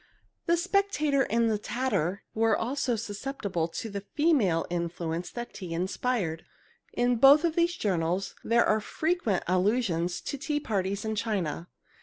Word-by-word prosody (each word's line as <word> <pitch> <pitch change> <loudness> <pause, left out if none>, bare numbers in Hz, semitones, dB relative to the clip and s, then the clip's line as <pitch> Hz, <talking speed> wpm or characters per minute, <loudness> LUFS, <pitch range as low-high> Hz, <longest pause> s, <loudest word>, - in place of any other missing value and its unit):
The 340 0 +4
Spectator 345 -7 +1
and 230 +1 +2
the 215 -2 +1
Tatter 205 -6 -1
were 225 -1 +2
also 250 0 -1
susceptible 205 -5 -3
to 170 - -5
the 200 -2 -5
female 210 - +2
influence 170 0 -3
that 240 0 -7
tea 175 -4 -6
inspired. 185 -1 -1 0.5
In 245 0 +2
both 275 +6 +7
of 330 -2 0
these 345 0 +2
journals 180 - -1
there 235 +1 +3
are 215 0 +2
frequent 310 - -1
allusions 185 -2 +1
to 280 - -5
tea 295 +1 -1
parties 200 -5 -2
and 220 0 -1
china. 195 -7 -2
220 Hz, 145 wpm, -28 LUFS, 180-270 Hz, 0.5 s, both